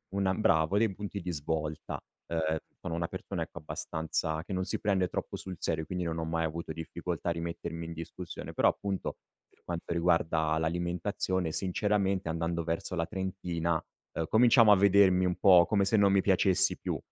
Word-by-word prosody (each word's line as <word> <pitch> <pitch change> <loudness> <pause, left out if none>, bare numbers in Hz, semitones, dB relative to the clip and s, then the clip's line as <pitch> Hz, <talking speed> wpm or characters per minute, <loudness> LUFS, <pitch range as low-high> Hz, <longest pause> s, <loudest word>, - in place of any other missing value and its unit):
una 95 -1 +2
bravo 80 -2 +2
dei 110 -2 +2
punti 100 0 -5
di 90 0 -3
svolta, 75 0 -3 0.3
uhm, 80 -1 0 0.2
sono 90 - -4
una 85 0 -1
persona 95 -1 -4
ecco 85 0 -9
abbastanza 80 0 -3
che 95 - -11
non 95 0 -1
si - - -1
prende 95 -3 +2
troppo - - -4
sul 95 -1 -6
serio 80 -1 -1
quindi 90 +2 -3
non 85 -1 -2
ho 80 - -2
mai 80 0 -1
avuto 80 0 -4
difficoltà 80 +2 -4
a - - +2
rimettermi 85 0 -4
in 85 - -6
discussione. 85 +2 -7
Però - - +3
appunto 100 -2 -2 0.3
per - - -32
quanto 85 0 -4
riguarda 85 -2 +2
l'alimentazione 85 +1 -1
sinceramente 95 0 0
andando 85 +1 -1
verso 85 +2 -2
la 85 -1 0
trentina, 90 -2 -2 0.4
uhm, 80 - -2
cominciavo 115 -1 +6
a - - +9
vedermi 95 -1 +5
un 90 -1 +1
po' 90 -4 +7
come 100 0 +2
se 110 +3 +3
non 100 -1 +5
mi 100 - +4
piacessi 95 0 +3
più - - -2
85 Hz, 180 wpm, -30 LUFS, 80-95 Hz, 0.4 s, a